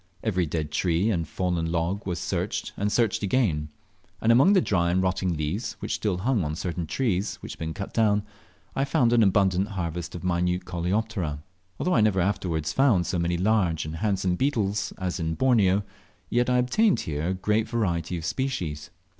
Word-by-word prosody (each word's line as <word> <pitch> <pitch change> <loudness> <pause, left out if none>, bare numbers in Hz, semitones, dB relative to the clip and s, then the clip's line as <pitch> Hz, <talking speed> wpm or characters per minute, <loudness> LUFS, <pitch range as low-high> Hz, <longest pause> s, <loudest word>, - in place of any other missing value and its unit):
Every 90 -6 0
dead 75 -1 -3
tree 90 +6 +1
and 85 -6 -1
fallen 85 -1 -1
log 85 +5 -1
was 90 -2 -1
searched 90 - -3
and 105 +1 -1
searched 115 -3 +1
again; 95 -9 +1 0.5
and 115 - +3
among 135 +12 +6
the 195 - +6
dry 85 - +1
and 90 +2 +2
rotting 95 -2 0
leaves, 75 +10 -2
which - - -5
still 100 -5 -1
hung 110 +1 +1
on 75 0 -2
certain 85 -1 -3
trees 105 - -1
which - - -7
had - - -15
been 80 0 -4
cut 100 - -6
down, 105 -2 +3 0.5
I 135 - +1
found 120 -3 +2
an 120 - +5
abundant 95 -1 +3
harvest 85 -5 -4
of 85 - -7
minute 90 0 0
Coleoptera. 90 -4 -2 0.4
Although 180 - +1
I 115 - +4
never 105 -3 +3
afterwards 85 -4 -1
found 120 -10 +3
so 90 - -1
many 85 +1 0
large 90 -5 +1
and 80 +1 -5
handsome 95 -2 0
beetles 105 -8 0
as 95 -1 -3
in 80 -1 -1
Borneo, 105 -6 +3 0.5
yet 120 +1 +2
I 125 - +3
obtained 175 - +3
here 75 +1 -3
a 95 - +1
great 105 +4 0
variety 90 -7 -1
of 80 - -6
species. 90 - -3
95 Hz, 190 wpm, -26 LUFS, 85-110 Hz, 0.5 s, among